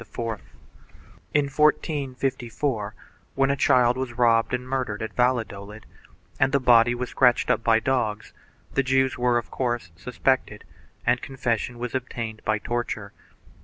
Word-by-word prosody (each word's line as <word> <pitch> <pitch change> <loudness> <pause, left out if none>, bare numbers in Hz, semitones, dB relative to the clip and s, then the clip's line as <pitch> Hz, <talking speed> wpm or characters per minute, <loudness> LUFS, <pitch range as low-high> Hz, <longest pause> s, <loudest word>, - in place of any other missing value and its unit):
2 - - -3 1.1
In 145 -1 +3
1454, 135 -6 -1 0.4
when 135 0 +3
a - - +1
child 125 -2 +3
was 130 -2 -3
robbed 115 -2 +3
and 125 0 -3
murdered 130 -6 -2
at 110 -1 -5
Valladolid 110 -4 -1 0.5
and 135 0 +3
the 140 - +3
body 120 -1 +5
was 125 0 -4
scratched 125 -2 +3
up 115 - 0
by 115 -1 +4
dogs, 115 -4 -1 0.4
the 135 - +3
Jews 130 0 +1
were, 120 -1 +3
of 120 - -4
course, 120 -8 -2
suspected 125 +1 -1 0.4
and 125 0 +2
confession 120 -2 -2
was 120 0 -5
obtained 115 -4 -4
by 110 0 +1
torture. 110 -3 -4
125 Hz, 140 wpm, -25 LUFS, 115-130 Hz, 1.1 s, body